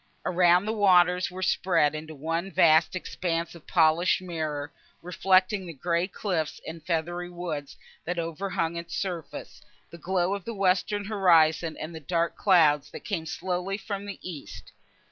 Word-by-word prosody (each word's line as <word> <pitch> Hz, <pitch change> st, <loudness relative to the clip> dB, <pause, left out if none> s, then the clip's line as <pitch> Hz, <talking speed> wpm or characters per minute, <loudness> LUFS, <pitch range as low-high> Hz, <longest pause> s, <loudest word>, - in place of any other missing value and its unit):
Around, 180 Hz, +1 st, +4 dB
the 220 Hz, -, -1 dB
waters 180 Hz, -3 st, +4 dB
were 185 Hz, +1 st, -6 dB
spread 170 Hz, -5 st, +2 dB
into 155 Hz, 0 st, -7 dB
one 165 Hz, +6 st, -3 dB
vast 160 Hz, -2 st, +4 dB
expanse 170 Hz, -2 st, -3 dB
of 170 Hz, -3 st, -15 dB
polished 165 Hz, 0 st, +3 dB
mirror, 155 Hz, -5 st, -4 dB, 0.3 s
reflecting 185 Hz, +2 st, +2 dB
the 165 Hz, -, -7 dB
grey 170 Hz, +4 st, -1 dB
cliffs 180 Hz, -6 st, -3 dB
and 160 Hz, -1 st, -8 dB
feathery 175 Hz, +1 st, -2 dB
woods, 170 Hz, -5 st, -6 dB, 0.3 s
that 175 Hz, +1 st, -3 dB
over 170 Hz, +3 st, -3 dB
hung 170 Hz, -2 st, -1 dB
its 170 Hz, 0 st, -6 dB
surface, 175 Hz, -5 st, -5 dB, 0.3 s
the 170 Hz, -, -11 dB
glow 180 Hz, +2 st, 0 dB
of 200 Hz, -2 st, -4 dB
the 230 Hz, +3 st, -6 dB
western 195 Hz, +2 st, +1 dB
horizon 165 Hz, -5 st, +3 dB
and 160 Hz, +2 st, -6 dB
the 160 Hz, -, -7 dB
dark 170 Hz, +2 st, -1 dB
clouds, 150 Hz, -7 st, +4 dB
that -, -, -10 dB
came 170 Hz, -6 st, -3 dB
slowly 180 Hz, +3 st, -3 dB
from 205 Hz, -1 st, -6 dB
the 200 Hz, -, -6 dB
east. 160 Hz, -6 st, -9 dB
175 Hz, 160 wpm, -27 LUFS, 160-185 Hz, 0.3 s, Around